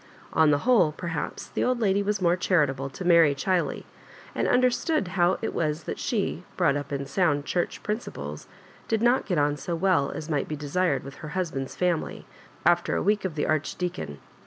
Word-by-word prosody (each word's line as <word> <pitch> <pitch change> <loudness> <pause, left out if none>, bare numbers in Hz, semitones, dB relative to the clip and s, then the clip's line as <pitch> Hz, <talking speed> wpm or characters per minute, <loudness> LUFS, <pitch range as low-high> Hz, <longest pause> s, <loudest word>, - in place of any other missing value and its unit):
On 160 -1 +5
the 145 - +4
whole, 240 -11 +5
perhaps, 160 -1 -5
the - - -1
old 250 -1 +1
lady 200 -3 +2
was 200 -1 -1
more 175 0 +4
charitable 145 -7 +1
to 140 +7 -7
Mary 165 -5 +6
Chiley, 175 +6 0 0.5
and - - 0
underatood 255 +5 +2
better 180 - -8
how 180 0 +2
it - - -2
was 155 0 -1
that - - -5
she, - - -1
brought 140 - +3
up 145 -1 -4
in 140 -1 -2
sound 145 -1 +1
Church 175 - -2
principles, 215 +3 -5 0.4
did 225 0 0
not 245 +2 +3
get 180 - 0
on 145 0 +2
so 170 +4 -3
well 165 -5 +2
as 155 - -6
might 150 -4 -1
be 155 - -3
desired 145 0 0
with 135 +1 -10
her 155 - -8
husband's 140 -8 -3
family, 180 -3 -1 0.4
after 175 0 +3
a - - 0
week 210 +1 +1
of 175 -5 -3
the 150 - 0
Arch 155 -1 0
deacon. 175 - -4
170 Hz, 200 wpm, -26 LUFS, 145-190 Hz, 0.5 s, Mary